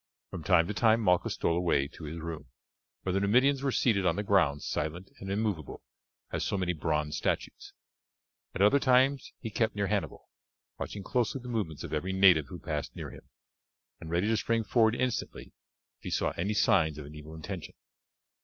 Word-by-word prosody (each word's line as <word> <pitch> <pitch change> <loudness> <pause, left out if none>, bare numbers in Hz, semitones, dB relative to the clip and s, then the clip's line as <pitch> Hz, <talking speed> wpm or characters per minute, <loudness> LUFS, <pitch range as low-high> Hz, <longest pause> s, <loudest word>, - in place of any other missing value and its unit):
From 90 - -5
time 90 -2 +4
to 105 - -3
time 110 +1 +4
Malchus 90 -3 +2
stole 85 - +1
away 85 -6 +1
to 80 - -10
his 80 +3 -6
room, 80 -3 -6 0.6
where 95 - -1
the 95 - +2
Numidians 130 +7 +3
were 135 -1 0
seated 110 -6 +2
on 85 -3 +2
the 105 - -2
ground 85 -8 +2
silent 85 +5 -3
and 95 - -7
immovable 100 -7 -2 0.5
as - - -2
so 100 - -1
many 90 -2 0
bronze 75 -1 -1
statues. - - -3 0.8
At 95 - +2
other 125 +8 +5
times 130 +1 +3
he 115 - -5
kept 110 +1 0
near 100 -1 0
Hannibal, 100 0 -2 0.5
watching 100 - -5
closely 125 +4 0
the 125 0 -9
movements 100 -11 -3
of - - -6
every 90 +5 -1
native 90 -6 +5
who - - -8
passed - - -4
near - - -6
him; - - -14 0.7
and 80 - -9
ready 85 +3 +1
to 110 +1 +2
spring 115 +1 0
forward 110 0 +3
instantly 125 -2 -3 0.5
if - - -52
he - - -3
saw - - 0
any 100 +5 -2
signs 85 -9 +3
of 75 - -7
an 75 - -11
evil 75 +1 -10
intention. 90 +1 -7
95 Hz, 190 wpm, -30 LUFS, 80-110 Hz, 0.8 s, other